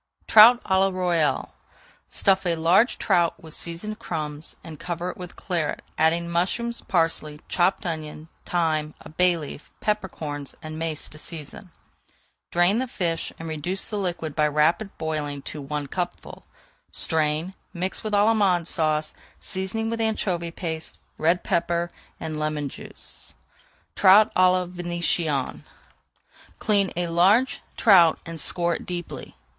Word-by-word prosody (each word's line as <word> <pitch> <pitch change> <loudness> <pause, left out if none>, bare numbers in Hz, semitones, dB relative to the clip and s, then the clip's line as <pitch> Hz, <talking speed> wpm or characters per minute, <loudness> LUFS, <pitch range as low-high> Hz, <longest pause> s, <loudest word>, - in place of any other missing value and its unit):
TROUT 230 +3 +8
À - - -9
LA 195 - +4
ROYALE 175 -4 0 0.6
Stuff 195 -2 +2
a 170 - +2
large 175 +9 +3
trout 170 -1 +2
with 160 -1 -7
seasoned 210 +6 -4
crumbs, 150 -5 -3
and 155 -3 -9
cover 175 +1 -3
it - - -13
with 180 -1 -8
Claret, 170 -5 -2
adding 170 +2 +2
mushrooms, 190 +8 -1
parsley, 165 -3 0
chopped 180 +2 +1
onion, 155 -2 -4 0.2
thyme, 155 -3 0
a - - -11
bay 180 +2 +3
leaf, 150 -1 -8
pepper 210 -2 -1
corns, 145 -4 -6
and 155 0 -6
mace 160 -2 -3
to 150 - -11
season. 165 +4 -8 0.8
Drain 175 +6 +4
the 260 - -1
fish 170 -8 -2
and 165 - -7
reduce 160 +5 -3
the 210 - -4
liquid 170 -5 -3
by 150 -1 +3
rapid 155 +7 +2
boiling 150 -3 -3
to 150 - -6
one 145 +1 -3
cupful. 175 +5 -5 0.5
Strain, 160 +3 +1 0.2
mix 185 +1 -3
with 215 -1 -3
Allemande 200 -5 +3
Sauce, 155 -2 0 0.3
seasoning 195 +4 -2
with 230 0 -2
anchovy 185 -6 -1
paste, 160 -2 -5 0.2
red 170 +3 +2
pepper, 170 -1 0 0.3
and 155 -1 -4
lemon 150 -2 -2
juice. - - -8 0.6
TROUT 205 +3 +6
À 185 0 +5
LA 185 0 +1
VÉNITIENNE 175 -5 -1 1.0
Clean 200 -3 +2
a 175 +1 0
large 190 +10 +3 0.2
trout 180 -7 +6
and 165 -1 -5
score 170 +3 +2
it - - -5
deeply. 175 -1 -6
170 Hz, 140 wpm, -25 LUFS, 155-185 Hz, 1.0 s, TROUT